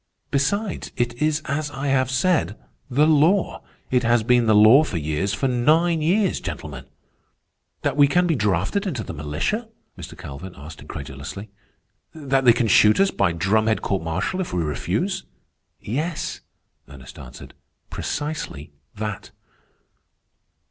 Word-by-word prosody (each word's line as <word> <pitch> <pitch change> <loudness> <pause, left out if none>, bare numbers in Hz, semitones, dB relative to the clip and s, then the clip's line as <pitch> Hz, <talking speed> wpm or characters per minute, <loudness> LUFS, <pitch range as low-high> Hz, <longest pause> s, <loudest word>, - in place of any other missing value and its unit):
Besides, 185 +9 -1
it 120 -1 0
is 155 0 +1
as 145 +2 -2
I 140 0 -4
have 130 -2 +2
said, 145 - +1 0.3
the 140 +4 +3
law. 160 +5 +2 0.3
It 125 -1 +3
has 120 -1 +2
been 120 0 +3
the 110 - +5
law 110 +8 +7
for 105 - -4
years, 80 +5 -1
for 135 - -1
nine 155 +7 +2
years, 185 +5 +1
gentlemen." 70 -4 -7 1.0
"That 140 -1 -1
we 145 -1 +7
can 175 +5 +2
be 170 - +2
drafted 105 - 0
into 130 - -3
the - - -7
militia?" 80 - -3 0.3
Mr. - - -10
Calvin 85 +7 -9
asked 75 +2 -11
incredulously. 80 +10 -8 0.6
"That 135 -3 0
they 120 - +8
can 115 -1 0
shoot 105 +1 +5
us 195 0 +4
by - - +1
drumhead 110 +6 +1
court 95 -1 -1
martial 80 - -2
if 180 - -5
we 85 - 0
refuse?" 75 -1 -2 0.6
"Yes," 155 +9 -3 0.5
Ernest 65 -2 -12
answered, 60 - -11 0.4
"precisely 145 - -5 0.2
that." 105 -1 -5
125 Hz, 140 wpm, -22 LUFS, 95-155 Hz, 1.0 s, they